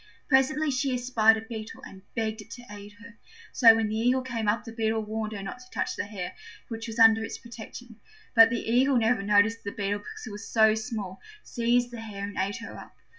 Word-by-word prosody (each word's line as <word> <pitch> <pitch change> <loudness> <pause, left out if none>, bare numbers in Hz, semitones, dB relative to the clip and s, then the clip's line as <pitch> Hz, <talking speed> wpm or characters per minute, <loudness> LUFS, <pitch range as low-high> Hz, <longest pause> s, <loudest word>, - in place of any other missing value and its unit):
Presently 295 +3 +3
she 260 0 0
espied 230 -3 +3
a - - -5
Beetle, 225 -1 -8
and 190 - -12
begged 220 -1 -2
it - - -15
to 245 - -11
aid 205 0 -10
her. 230 +2 -15 0.3
So 230 -3 +7
when 225 -1 0
the 215 - -3
Eagle 250 +3 +2
came 235 -4 -3
up 210 +2 +1
the 225 - -9
Beetle 220 -1 -1
warned 215 0 -4
her 200 -2 -6
not 195 +5 -7
to 250 0 -16
touch - - -3
the - - -3
hare, 195 -4 -6 0.4
which 225 0 -6
was 225 0 -7
under 225 -1 +6
its 225 - -5
protection. 235 0 -11 0.4
But 225 -1 +8
the 235 -1 -3
Eagle 255 +3 +3
never 225 -1 +2
noticed 210 +3 +3
the 200 - -4
Beetle 205 0 -2
because 205 - -10
it 220 - -7
was 205 +2 -8
so 220 -1 +5
small, 220 -4 -5 0.2
seized 240 0 0
the 235 -1 -7
hare 205 -3 -7
and 200 0 -5
ate 195 +4 -1
her 225 - -8
up. - - -12
225 Hz, 230 wpm, -27 LUFS, 210-240 Hz, 0.4 s, But